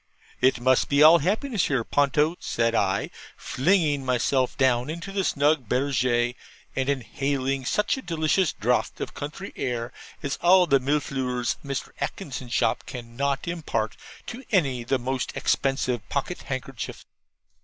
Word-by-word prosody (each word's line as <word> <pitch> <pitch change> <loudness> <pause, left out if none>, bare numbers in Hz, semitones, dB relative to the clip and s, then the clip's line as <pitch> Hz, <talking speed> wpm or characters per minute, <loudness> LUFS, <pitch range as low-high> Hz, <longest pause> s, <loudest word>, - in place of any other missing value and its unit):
'It 130 -1 +3
must 130 +1 +3
be 140 +1 +5
all 165 +2 +9
happiness 215 - 0
here, 130 -5 0
Ponto,' 145 +5 +2
said 115 0 0
I, 95 -3 0 0.3
flinging 150 -1 +1
myself 130 0 +1
down 125 0 +2
into 170 +4 -5
the 195 -1 0
snug 145 - +1
BERGERE, 125 -2 +1 0.4
and 130 +1 0
inhaling 135 0 -1
such 210 - +1
a - - -5
delicious 165 - +1
draught - - 0
of - - -5
country 155 +7 -7
air 120 -1 -3 0.3
as 140 -1 -2
all 180 +1 +6
the 140 -5 +4
MILLEFLEURS 130 -3 -1
of - - -21
Mr. 135 - -3
Atkinson's 130 -9 -5
shop - - +1
cannot 135 +4 -3
impart 170 -2 -2 0.3
to 245 +3 -7
any 135 - +2
the 135 +3 +1
most 130 +1 -3
expensive 130 -5 0
pocket 145 +5 -2
handkerchief. 130 -2 -5
135 Hz, 145 wpm, -25 LUFS, 125-155 Hz, 0.4 s, all